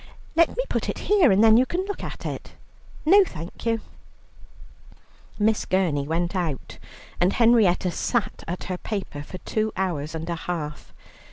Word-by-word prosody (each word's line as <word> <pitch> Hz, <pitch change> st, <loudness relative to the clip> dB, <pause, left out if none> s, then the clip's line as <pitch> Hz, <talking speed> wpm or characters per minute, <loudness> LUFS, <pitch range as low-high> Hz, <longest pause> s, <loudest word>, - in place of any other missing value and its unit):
Let 335 Hz, +5 st, +3 dB
me -, -, +1 dB
put -, -, -2 dB
it -, -, -3 dB
here, 395 Hz, -, +4 dB
and 195 Hz, +3 st, +4 dB
then 220 Hz, 0 st, +7 dB
you 255 Hz, -, +5 dB
can 365 Hz, +2 st, -2 dB
look 405 Hz, 0 st, -5 dB
at -, -, -7 dB
it." -, -, -6 dB, 0.5 s
"No, 395 Hz, +5 st, +7 dB
thank 170 Hz, -, -8 dB
you." 225 Hz, -1 st, +1 dB, 1.6 s
Miss 215 Hz, +1 st, +2 dB
Gurney 165 Hz, -7 st, +1 dB
went 170 Hz, +4 st, -1 dB
out, 165 Hz, -7 st, -3 dB, 0.4 s
and 180 Hz, +2 st, +3 dB
Henrietta 220 Hz, -7 st, +4 dB
sat 215 Hz, +2 st, -1 dB
at 175 Hz, +2 st, -4 dB
her 180 Hz, -1 st, -4 dB
paper 195 Hz, -9 st, -4 dB
for 185 Hz, +6 st, -8 dB
two 215 Hz, +3 st, -2 dB
hours 165 Hz, -5 st, -2 dB
and 160 Hz, 0 st, -5 dB
a 170 Hz, -, -1 dB
half. 160 Hz, -3 st, -5 dB
190 Hz, 165 wpm, -24 LUFS, 170-230 Hz, 1.6 s, then